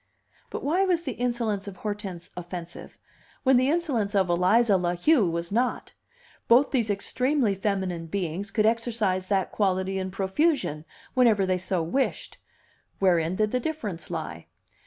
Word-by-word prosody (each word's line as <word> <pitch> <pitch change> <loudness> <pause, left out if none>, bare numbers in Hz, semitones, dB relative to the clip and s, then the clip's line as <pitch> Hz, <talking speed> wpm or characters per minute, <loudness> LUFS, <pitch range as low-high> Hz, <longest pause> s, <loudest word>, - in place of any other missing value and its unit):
But - - -5
why 340 +7 +2
was 355 -3 +1
the 275 - -3
insolence 235 -5 -2
of 195 -2 -8
Hortense 200 -4 -6
offensive, 175 -1 -8 0.5
when 265 -1 +5
the 255 +2 +3
insolence 270 -11 0
of 190 -3 +2
Eliza 195 +5 +4
La 175 -1 0
Heu 220 - +3
was 170 +1 -3
not? 245 +4 -1 0.5
Both 245 +5 +5
these 235 -5 +1
extremely 250 +3 +1
feminine 190 -4 -2
beings 185 +2 -3
could 215 -2 +1
exercise 220 -5 0
that 195 -2 0
quality 190 -1 0
in 190 0 -3
profusion, 190 - 0 0.3
whenever 225 -6 +4
they 185 -1 0
so 185 -2 -1
wished; 270 - -2 0.6
wherein 175 -2 +2
did 215 +1 +1
the 250 - +1
difference 235 - -4
lie? - - -5
200 Hz, 150 wpm, -26 LUFS, 185-245 Hz, 0.6 s, when